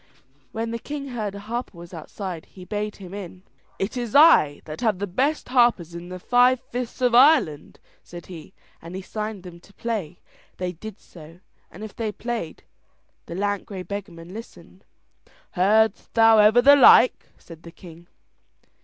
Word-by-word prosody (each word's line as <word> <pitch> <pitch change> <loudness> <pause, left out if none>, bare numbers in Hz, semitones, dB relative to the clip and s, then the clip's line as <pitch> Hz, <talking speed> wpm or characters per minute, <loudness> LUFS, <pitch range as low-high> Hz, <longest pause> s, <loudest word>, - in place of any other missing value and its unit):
When 225 +1 -4
the 230 - -4
king 280 +2 -7
heard 215 -5 -4
a - - -7
harper 230 -2 -6
was 170 +1 -12
outside, 175 +1 -7
he 185 -2 -14
bade 210 +1 -4
him 190 -2 -11
in. 185 -2 -9 0.3
"It 195 +5 -3
is 240 -2 -4
I 285 - +6
that 155 0 -8
have 220 -5 +1
the 200 - -3
best 260 - -1
harpers 240 -10 +2
in 170 +1 -9
the 185 - -7
five 245 +6 +3
fifths 250 +1 -5
of 250 -2 +2
Ireland," 250 - +3 0.2
said 175 -1 -11
he, 165 -4 -12 0.3
and 170 +2 -9
he 190 - -6
signed 215 -1 -6
them 175 -2 -11
to 195 - -21
play. 205 -8 -4 0.4
They 180 -1 -3
did 200 +4 -10
so, 165 0 -15 0.3
and 200 - -11
if 220 - -9
they 225 -3 -3
played, 230 -7 -6 0.6
the 170 - -7
lank 205 +1 -2
grey 190 -3 -7
beggarman 180 -3 -8
listened. 225 +2 -12 0.7
"Heardst 215 +4 +1
thou 225 -1 +6
ever 215 +3 +5
the 285 +2 +8
like?" 255 -2 +6
said 165 -2 -14
the 170 - -12
king. 170 0 -15
205 Hz, 170 wpm, -23 LUFS, 175-235 Hz, 0.7 s, the